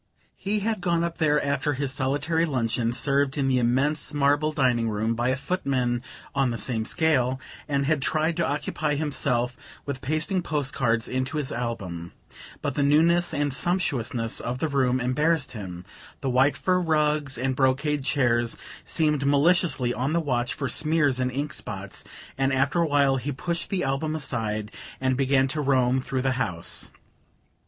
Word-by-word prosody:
He 205 +2 -1
had 215 -1 -1
gone 170 -1 +1
up 170 -1 -3
there 150 -2 +3
after 140 +1 0
his 140 -1 -2
solitary 145 +5 0
luncheon, 120 -6 0
served 140 +3 +1
in 135 -2 +1
the 130 -1 +3
immense 140 +6 +1
marble 145 +2 +2
dining 125 -6 +1
room 110 +2 0
by 120 +2 0
a 130 - +2
footman 130 -6 -1 0.3
on 135 -2 +2
the 115 - -2
same 110 +1 -1
scale, 130 -5 +1 0.3
and 140 -2 0
had 150 -1 +1
tried 155 +3 +1
to 170 - +2
occupy 150 0 -1
himself 130 -4 0 0.3
with 140 -2 -4
pasting 155 +7 0
post 145 -4 -2
cards 115 -3 +1
into 130 +3 -2
his 145 -3 -2
album; 95 -8 -4 0.5
but 140 - -1
the 145 - -1
newness 165 +5 +4
and 145 -3 0
sumptuousness 135 -9 0
of 120 +1 -3
the 160 - -1
room 130 -3 +1
embarrassed 145 +4 +1
him 95 -6 -7 0.4
the 135 - -1
white 130 +3 +3
fur 185 -1 +2
rugs 150 -4 +1
and 130 +2 -1
brocade 140 +2 +1
chairs 120 -4 +1 0.3
seemed 150 -3 0
maliciously 145 -3 +3
on 130 +5 -1
the 170 - +3
watch 125 -6 -1
for 140 - -2
smears 150 0 +2
and 130 0 0
ink 140 +3 -3
spots 100 -1 -6 0.4
and 135 0 +2
after 135 +4 +1
a 165 - +2
while 140 -2 +3
he 135 +3 -3
pushed 170 +5 -3
the 190 -2 -1
album 140 +3 -1
aside 110 -8 -3 0.3
and 130 0 +1
began 135 0 +3
to 150 +3 -2
roam 130 -2 +2
through 130 0 -2
the 135 - +2
house. 85 -7 -1
140 Hz, 170 wpm, -25 LUFS, 125-150 Hz, 0.5 s, newness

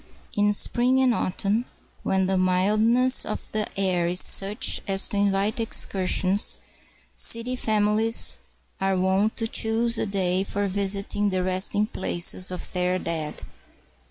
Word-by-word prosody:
In 205 0 +2
spring 250 +5 +1
and 260 -2 +3
autumn, 205 +4 -1 0.4
when 190 0 0
the 190 +1 0
mildness 215 +8 +2
of - - -5
the 215 -1 -1
air 180 -3 +1
is 180 +1 +1
such 200 +2 +2
as 195 0 +2
to 205 - -3
invite 200 +2 +1
excursions, 195 -3 0 0.6
city 235 +2 0
famihes 220 0 +1 0.4
are 195 0 0
wont 190 +4 +1
to 225 - -1
choose 225 +1 0
a - - -1
day 190 -1 +1
for 200 +1 -2
visiting 200 +1 0
the 185 -1 -1
resting 185 +3 0
places 185 -2 0
of 180 -1 -6
their 180 0 +1
dead. 160 -4 -3
200 Hz, 135 wpm, -24 LUFS, 185-220 Hz, 0.6 s, and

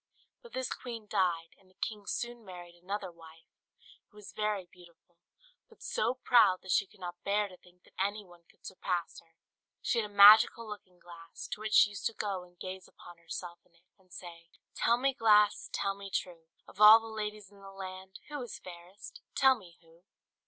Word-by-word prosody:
But 475 - -16
this 260 -1 -3
queen 230 -3 -8
died; 170 -4 -1
and 190 - -26
the 185 - -28
king 210 -1 -5
soon 240 -1 -4
married 175 -3 -11
another 185 +2 -6
wife, 165 -1 -16 0.6
who - - -28
was 210 - -12
very 210 -3 -2
beautiful, 175 -1 -21 0.5
but 450 - -18
so 370 - -1
proud 235 -7 +4
that 185 - -5
she 200 - +2
could 210 - -23
not 175 -1 -8
bear 205 +1 +1
to 185 - -14
think 180 0 -24
that - - -24
any 205 +2 -1
one 175 -1 -18
could - - -25
surpass 180 -2 -4
her. 165 -1 -25 0.4
She 235 - 0
had 210 -2 -3
a - - -19
magical 215 +3 +8
looking 200 -4 -10
glass, 170 -1 -11
to - - -4
which 215 0 -4
she 210 - +6
used 200 - -3
to 230 - -7
go 200 -3 -3
and 175 0 -20
gaze 185 0 -7
upon 175 -1 -15
herself 170 +1 -7
in 170 - -33
it, 170 +1 -30
and 185 -1 -29
say, 170 -2 -11 0.2
"Tell 235 - +2
me, 270 +2 +1
glass, 210 -3 +3
tell 195 - -1
me 200 0 -10
true! 170 -4 -4 0.2
Of 205 - -11
all 215 +1 +10
the 225 - -11
ladies 210 -2 -6
in 200 - -18
the 195 - -11
land. 190 0 -9
Who 295 -2 -5
is 245 -4 -7
fairest? 180 +2 -12
Tell 265 -1 +6
me 180 -7 -15
who?" 165 +1 -23
190 Hz, 205 wpm, -31 LUFS, 175-215 Hz, 0.6 s, all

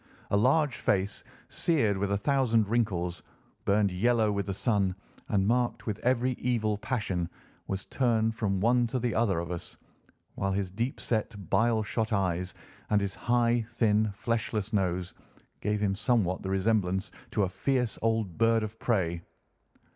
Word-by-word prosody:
A - - +3
large 130 +5 +3
face, 100 0 0 0.2
seared 120 - +1
with 100 0 -1
a 100 - +2
thousand 115 -2 +2
wrinkles, 95 -7 0 0.4
burned 100 -1 +3
yellow 110 +3 +2
with 100 0 -2
the 100 - -1
sun, 100 -4 +1 0.3
and 100 -3 +2
marked 120 +3 +1
with 110 -2 -3
every 125 +1 +2
evil 110 -4 +1
passion, 95 -9 -2 0.4
was 95 0 -3
turned 115 -4 +1
from 100 -4 -1
one 120 +3 +3
to 120 - -2
the 120 -2 -1
other 110 -6 +2
of 85 +1 -3
us, 85 - -6 0.6
while 95 0 -1
his 95 -1 -2
deep 115 +7 -2
set, 110 -1 -1 0.2
bile 110 -1 +3
shot 110 +2 -2
eyes, 90 -3 0 0.3
and 105 - +4
his 100 -1 -2
high, 120 -1 +2
thin, 110 -2 +2
fleshless 110 0 -2
nose, 90 -2 0 0.5
gave 105 0 -1
him 100 -2 +2
somewhat 100 -3 +1
the 95 - -4
resemblance 95 -1 +1 0.2
to 105 - +1
a 95 - 0
fierce 125 +4 -1
old 110 -5 0
bird 115 -1 +4
of 110 +1 -6
prey. 85 -7 0
110 Hz, 160 wpm, -29 LUFS, 95-115 Hz, 0.6 s, and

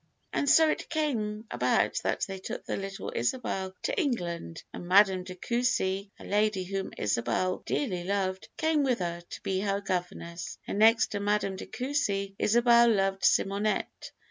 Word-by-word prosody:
"And 285 - +1
so 320 +2 +7
it 310 - -2
came 225 -9 -1
about - - +1
that - - -1
they 195 -1 -3
took - - -6
the - - -2
little 195 0 -5
Isabel 190 - -2
to - - 0
England, 170 - -3
and 175 - -7
Madame 190 0 +5
de 185 0 -8
Coucy, 200 -3 0
a - - -13
lady 210 -1 +1
whom 195 +1 -4
Isabel 115 - 0
dearly 185 -11 -1
loved, 190 0 -2
came 315 -2 +2
with 260 -4 +2
her 170 -1 -3
to 175 - -10
be 190 -1 0
her 200 0 0
governess; 180 -3 -4
and 200 - -3
next 225 +2 +5
to 205 - -2
Madame 205 -1 0
de - - -8
Coucy, 220 -8 -1
Isabel 235 +1 +5
loved 195 -2 +1
Simonette. 200 +2 +1
200 Hz, 165 wpm, -29 LUFS, 185-235 Hz, -, so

